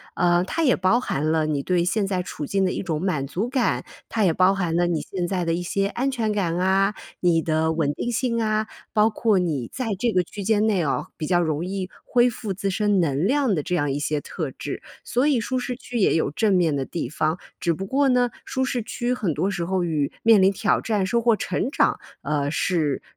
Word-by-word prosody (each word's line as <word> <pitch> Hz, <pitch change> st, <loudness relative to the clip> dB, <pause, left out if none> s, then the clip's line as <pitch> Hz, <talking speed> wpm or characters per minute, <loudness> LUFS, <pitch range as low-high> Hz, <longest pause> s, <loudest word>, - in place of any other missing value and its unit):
呃， 175 Hz, -1 st, +3 dB
它 330 Hz, -, -1 dB
也 260 Hz, -, +4 dB
包 185 Hz, +6 st, +3 dB
含 155 Hz, -, -1 dB
了 160 Hz, -1 st, +2 dB
你 150 Hz, -2 st, -1 dB
对 180 Hz, +2 st, +1 dB
现 195 Hz, +2 st, 0 dB
在 185 Hz, -2 st, -1 dB
处 150 Hz, -, -6 dB
境 195 Hz, +5 st, 0 dB
的 185 Hz, -, +1 dB
一 -, -, -3 dB
种 160 Hz, -5 st, -2 dB
满 150 Hz, -8 st, -1 dB
足 190 Hz, -, -2 dB
感， 260 Hz, -1 st, 0 dB, 0.3 s
它 220 Hz, -, 0 dB
也 185 Hz, -, +4 dB
包 185 Hz, +3 st, +4 dB
含 180 Hz, -4 st, -1 dB
了 175 Hz, 0 st, +2 dB
你 170 Hz, -2 st, 0 dB
现 180 Hz, -2 st, -3 dB
在 180 Hz, -1 st, -1 dB
的 165 Hz, -, +1 dB
一 175 Hz, -, -1 dB
些 195 Hz, +3 st, 0 dB
安 245 Hz, +6 st, -1 dB
全 230 Hz, -5 st, -1 dB
感 180 Hz, -5 st, 0 dB
啊、 190 Hz, +2 st, +2 dB, 0.2 s
你 170 Hz, -2 st, +3 dB
的 160 Hz, 0 st, +1 dB
稳 155 Hz, -3 st, 0 dB
定 240 Hz, -, -3 dB
性 235 Hz, -1 st, 0 dB
啊， 215 Hz, 0 st, +1 dB, 0.3 s
包 215 Hz, +1 st, +4 dB
括 215 Hz, -2 st, +2 dB
你 155 Hz, -9 st, -1 dB
在 255 Hz, -, -3 dB
这 235 Hz, +2 st, +1 dB
个 180 Hz, -, +3 dB
区 200 Hz, +4 st, -8 dB
间 215 Hz, +1 st, +2 dB
内 205 Hz, -5 st, +2 dB
啊， 145 Hz, -4 st, -1 dB
比 155 Hz, -, -3 dB
较 175 Hz, -2 st, +3 dB
容 160 Hz, -1 st, -1 dB
易 190 Hz, -1 st, -3 dB, 0.2 s
恢 245 Hz, 0 st, +4 dB
复 230 Hz, -3 st, -5 dB
自 195 Hz, +1 st, -2 dB
身 205 Hz, 0 st, +2 dB
能 150 Hz, +2 st, +1 dB
量 270 Hz, -2 st, +2 dB
的 160 Hz, -, 0 dB
这 180 Hz, -, -2 dB
样 145 Hz, -5 st, 0 dB
一 140 Hz, -, -2 dB
些 150 Hz, +1 st, -1 dB
特 -, -, -4 dB
质。 -, -, -6 dB, 0.2 s
所 255 Hz, +4 st, +1 dB
以 280 Hz, -5 st, +3 dB
舒 255 Hz, +3 st, -1 dB
适 250 Hz, 0 st, -3 dB
区 245 Hz, -1 st, -6 dB
也 195 Hz, -, +3 dB
有 160 Hz, -3 st, +1 dB
正 210 Hz, +7 st, +1 dB
面 170 Hz, -4 st, +2 dB
的 135 Hz, -, -1 dB
地 165 Hz, -3 st, -4 dB
方。 155 Hz, +2 st, 0 dB, 0.2 s
只 170 Hz, -, +1 dB
不 190 Hz, +5 st, -5 dB
过 275 Hz, +7 st, +2 dB
呢， 250 Hz, -1 st, +3 dB, 0.2 s
舒 260 Hz, -, -1 dB
适 250 Hz, -2 st, -1 dB
区 240 Hz, +3 st, -2 dB
很 205 Hz, -10 st, -1 dB
多 195 Hz, -, 0 dB
时 175 Hz, -4 st, -2 dB
候 185 Hz, 0 st, 0 dB
与 155 Hz, -4 st, 0 dB
面 225 Hz, -3 st, +6 dB
临 190 Hz, +1 st, +5 dB
挑 205 Hz, -, +1 dB
战、 210 Hz, -4 st, 0 dB
收 235 Hz, +5 st, +1 dB
获 230 Hz, -1 st, +4 dB
成 185 Hz, +4 st, -2 dB
长， -, -, +2 dB, 0.2 s
呃， 145 Hz, -2 st, 0 dB
是 155 Hz, -3 st, 0 dB
190 Hz, 260 characters per minute, -24 LUFS, 165-220 Hz, 0.3 s, 面